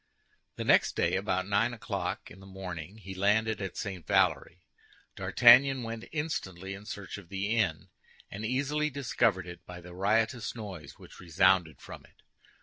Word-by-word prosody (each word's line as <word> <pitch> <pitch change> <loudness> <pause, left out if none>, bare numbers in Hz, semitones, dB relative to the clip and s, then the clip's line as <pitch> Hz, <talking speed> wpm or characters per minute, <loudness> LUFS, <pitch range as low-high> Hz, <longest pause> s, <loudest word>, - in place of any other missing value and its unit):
The - - -4
next - - +4
day - - +1
about 95 +1 -1
nine 115 +4 +1
o'clock 110 - -4
in 95 - -13
the 95 - -13
morning, 95 -1 -7
he 95 -3 -9
landed 105 +3 +1
at 95 -2 -5
St. 95 -4 -5
Valery. 90 0 +1 0.5
D'Artagnan 130 +2 +6
went 115 0 -6
instantly 95 - -4
in 100 +2 -10
search 100 -3 -6
of 90 -4 -16
the 100 +3 -1
inn, 90 -9 0 0.4
and 100 +3 -6
easily 140 +6 0
discovered 120 - 0
it 85 0 -10
by 90 0 -8
the 90 0 -12
riotous 110 +5 0
noise 105 -5 -8
which - - -14
resounded 90 -2 +2
from - - -11
it. - - -26
100 Hz, 160 wpm, -30 LUFS, 95-115 Hz, 0.5 s, D'Artagnan